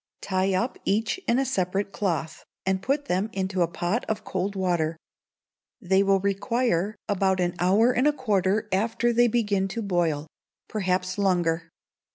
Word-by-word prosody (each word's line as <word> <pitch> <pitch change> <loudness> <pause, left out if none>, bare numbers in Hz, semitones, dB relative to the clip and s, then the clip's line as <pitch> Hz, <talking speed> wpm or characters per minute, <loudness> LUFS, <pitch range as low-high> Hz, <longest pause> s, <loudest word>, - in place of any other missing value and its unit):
Tie 190 0 0
up 235 +7 -1
each 220 - 0
in 235 - +3
a 270 - +2
separate 195 -4 -1
cloth, 170 -6 -2 0.2
and 190 0 +1
put 275 +6 0
them 190 +2 0
into 190 -1 -1
a 170 - +4
pot 175 +7 -2
of 220 -1 -2
cold 190 +2 -2
water. 170 -4 0 0.8
They 190 -2 +2
will 195 -1 +3
require 200 0 0
about 190 -2 +1
an 175 -1 +1
hour 200 +7 +4
and 255 +3 +2
a - - +5
quarter 210 -5 0
after 225 +4 +1
they 240 +1 +5
begin 205 -4 +1
to 225 +4 -4
boil, 170 -6 0 0.4
perhaps 185 -2 -1
longer. 175 -4 +1
195 Hz, 160 wpm, -26 LUFS, 180-220 Hz, 0.8 s, a